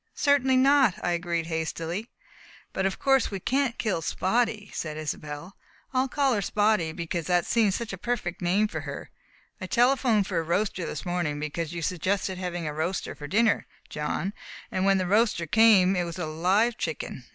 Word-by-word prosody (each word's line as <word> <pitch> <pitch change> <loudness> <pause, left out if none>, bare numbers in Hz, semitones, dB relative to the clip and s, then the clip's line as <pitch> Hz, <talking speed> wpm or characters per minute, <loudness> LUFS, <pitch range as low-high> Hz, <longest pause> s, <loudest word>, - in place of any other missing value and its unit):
"Certainly 265 -2 +3
not!" 265 -6 +5
I 175 - +1
agreed 170 -1 -1
hastily. 165 +6 -3 0.6
"But 190 0 +1
of 195 - -4
course 270 -2 +3
we 195 - -4
can't 260 +3 0
kill 210 -7 -1
Spotty," 210 +4 0
said 155 -1 -4
Isobel. 155 +3 -6 0.4
"I 260 +1 +2
call 275 0 +1
her 205 - 0
Spotty 205 -4 +1
because 170 0 -4
that 175 -1 +2
seems 215 -5 +2
such 230 -4 -4
a 195 - -6
perfect 215 -7 -3
name 190 +5 +2
for - - -5
her. - - -7 0.5
I 185 - -4
telephoned 240 -2 +3
for 180 -3 -1
a - - -1
roaster 180 +2 -1
this - - -5
morning, 175 -5 -1
because 150 +2 -3
you 170 -1 -4
suggested 185 +2 -1
having 175 -2 -3
a 150 - -3
roaster 165 +5 -2
for 145 - -8
dinner, 215 +6 +2 0.2
John, 155 +6 -3 0.4
and 185 0 0
when 195 0 +4
the 185 - 0
roaster 210 -2 +2
came 195 0 +5
it 180 - +1
was 170 0 -6
a 175 - -2
live 190 +9 +1
chicken! 150 -5 -4
185 Hz, 185 wpm, -27 LUFS, 170-225 Hz, 0.6 s, not